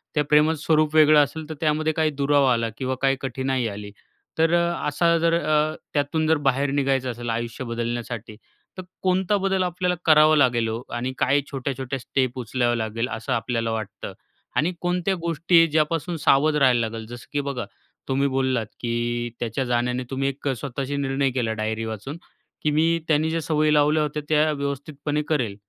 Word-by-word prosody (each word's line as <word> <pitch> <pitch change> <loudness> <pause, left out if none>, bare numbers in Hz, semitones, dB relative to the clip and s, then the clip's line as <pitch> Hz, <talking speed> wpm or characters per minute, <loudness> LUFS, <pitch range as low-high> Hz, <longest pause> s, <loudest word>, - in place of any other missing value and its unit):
त्या 150 - +3
प्रेमाचं 150 +1 +3
स्वरूप 155 -1 +2
वेगळं 155 -1 +7
असेल, 155 +2 -6
तर - - -3
त्यामध्ये 155 0 +1
काही 155 0 +1
दुरावा 140 -1 +3
आला 115 -1 0
किंवा 130 0 -2
काही 135 0 +3
कठीणाई 130 -1 -2
आली, 105 -1 -7 0.5
तर 165 +1 +3
असा 170 -1 +2
जर 165 0 +2
अ, 155 -1 +1 0.2
त्यातून 150 +2 0
जर 160 0 +4
बाहेर 135 +1 +1
निघायचं 135 -2 0
असेल, 120 0 -6
आयुष्य 115 +2 -3
बदलण्यासाठी. 115 -2 -4 0.4
तर 185 - -6 0.2
कोणता 190 +2 +1
बदल 195 -1 0
आपल्याला 180 0 -1
करावा 155 0 +6
लागेल 120 -5 +3
ओ? 115 +2 -3
आणि 125 +2 -3
काय 140 +2 +2
छोट्या-छोट्या 135 -1 -3
स्टेप 130 -1 -1
उचलावं 120 0 0
लागेल 115 +1 -2
असं 110 0 -3
आपल्याला 115 -1 -1
वाटतं? 110 -3 -5 0.4
आणि 165 +5 +2
कोणत्या 180 +1 0
गोष्टी 165 +1 +3
ज्यापासून 160 +2 0
सावध 150 +1 +3
राहायला 130 -4 +4
लागेल? 110 0 -7
जसं 120 +1 -10
की 145 - +1
बघा, 140 -3 -4 0.4
तुम्ही 135 +1 +1
बोललात, 130 -3 0
की 120 0 -2
त्याच्या 120 +3 -2
जाण्याने 125 +1 0
तुम्ही 135 0 -1
एक 140 +1 -6
स्वतःशी 140 +2 -4
निर्णय 135 0 0
केला 120 -3 -1
डायरी 110 +1 -2
वाचून, 110 +7 -6 0.5
की 150 - +2
मी 165 +2 +2
त्यांने 155 0 +2
ज्या 165 +1 -1
सवयी 155 -1 +1
लावल्या 150 +1 +3
होत्या, 150 0 -3
त्या 155 0 +3
व्यवस्थितपणे 145 +1 -3
करेल. 125 -10 0
140 Hz, 170 wpm, -24 LUFS, 120-155 Hz, 0.5 s, वेगळं